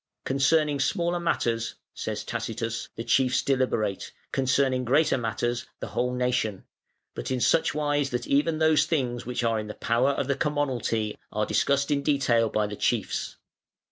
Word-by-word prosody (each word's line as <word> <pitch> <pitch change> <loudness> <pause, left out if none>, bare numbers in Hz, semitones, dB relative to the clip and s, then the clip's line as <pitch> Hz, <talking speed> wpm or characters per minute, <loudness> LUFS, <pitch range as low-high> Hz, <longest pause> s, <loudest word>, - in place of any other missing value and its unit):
"Concerning 145 +2 +2
smaller 175 +5 0
matters", 115 -9 -1 0.2
says - - -4
Tacitus, 115 0 -4
"the 115 - -4
chiefs 125 +2 +2
deliberate; 125 -7 0 0.2
concerning 130 -1 +1
greater 145 +6 +3
matters, 120 0 -2
the - - -5
whole 125 +1 -1
nation; 125 -5 0 0.5
but - - -5
in 130 -1 0
such 150 - +2
wise 145 -2 +1
that 120 -1 -3
even 150 +3 +2
those 155 -1 +4
things 125 -8 -1
which 125 0 -2
are 115 -1 +1
in 105 - -5
the 105 - -7
power 120 +4 +1
of 140 -1 -1
the 140 - +2
commonalty 130 -7 -1
are 105 0 0
discussed 140 +7 +1
in 140 -1 +2
detail 130 -6 +2
by 105 0 +1
the 105 0 -5
chiefs. - - -1
130 Hz, 160 wpm, -26 LUFS, 115-145 Hz, 0.5 s, those